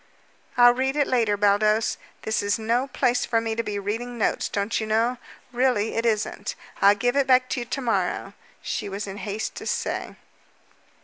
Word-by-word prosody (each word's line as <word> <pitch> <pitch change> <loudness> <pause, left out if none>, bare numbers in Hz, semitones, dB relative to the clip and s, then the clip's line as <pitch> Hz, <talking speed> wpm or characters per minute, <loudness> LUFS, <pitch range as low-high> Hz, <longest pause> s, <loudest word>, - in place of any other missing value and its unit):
"I'll 245 0 +8
read 265 +2 -1
it 290 -1 +3
later, 230 -6 +1
Baldos. 210 +2 +2 0.2
This 220 - 0
is 205 0 +1
no 235 +4 0
place 250 -2 +1
for 230 - +1
me 225 0 -2
to 230 - -1
be 210 -3 -4
reading 225 +5 -4
notes, 215 - 0
don't 205 +3 -1
you 220 - -3
know? 230 +3 +1 0.3
Really, 245 -4 +1
it 230 +1 0
isn't. 215 -1 -1 0.3
I'll 200 +1 +7
give 245 +5 0
it 280 -1 +2
back 255 -1 +4
to - - -1
you 240 - -4
to 275 - -3
morrow," 235 -3 -1 0.3
she 205 - -3
was 200 +2 -4
in 195 0 -7
haste 210 +1 -4
to - - -6
say. - - -2
225 Hz, 190 wpm, -25 LUFS, 210-245 Hz, 0.3 s, I'll